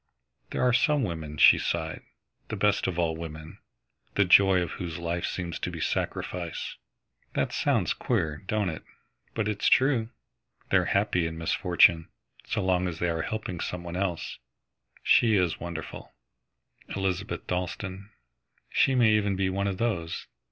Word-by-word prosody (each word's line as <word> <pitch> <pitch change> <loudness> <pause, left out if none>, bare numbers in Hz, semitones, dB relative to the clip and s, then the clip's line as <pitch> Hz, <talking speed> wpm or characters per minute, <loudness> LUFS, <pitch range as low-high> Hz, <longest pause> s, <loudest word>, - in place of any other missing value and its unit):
"There - - -1
are 125 -1 +4
some 150 +2 +3
women," 80 -6 -4
she - - +7
sighed, - - -2 0.5
"the - - -4
best 105 0 +2
of 90 - -2
all 85 -2 +1
women, 80 -1 -8 0.6
the 100 - +4
joy 95 0 +6
of 85 - -5
whose 85 -4 -5
life 85 0 -2
seems 85 -3 -4
to - - -2
be - - -7
sacrifice. 85 -3 -3 0.6
That - - -1
sounds - - +1
queer, 75 -2 -1
don't 105 -3 0
it, 80 - -8 0.5
but 110 -2 0
it's 105 -1 0
true. 130 -4 +3 0.6
They're - - +4
happy 100 -4 +1
in 80 0 -6
misfortune, 85 0 +3 0.4
so 105 -3 -1
long 90 -1 +2
as 85 -3 -4
they 90 - 0
are 80 -1 -1
helping 100 -3 -4
some 90 +1 -4
one 85 0 -6
else. 95 -3 -3 0.6
She 115 -3 +5
is 90 -4 +1
wonderful, 85 -2 -7 0.8
Elizabeth 95 +1 -2
Dalstan. 95 +2 -4 0.6
She 135 - +3
may 120 -3 +5
even 105 -2 +2
be 95 0 0
one 100 +1 -1
of 95 -2 -2
those. 85 -8 -2
90 Hz, 155 wpm, -27 LUFS, 85-105 Hz, 0.8 s, she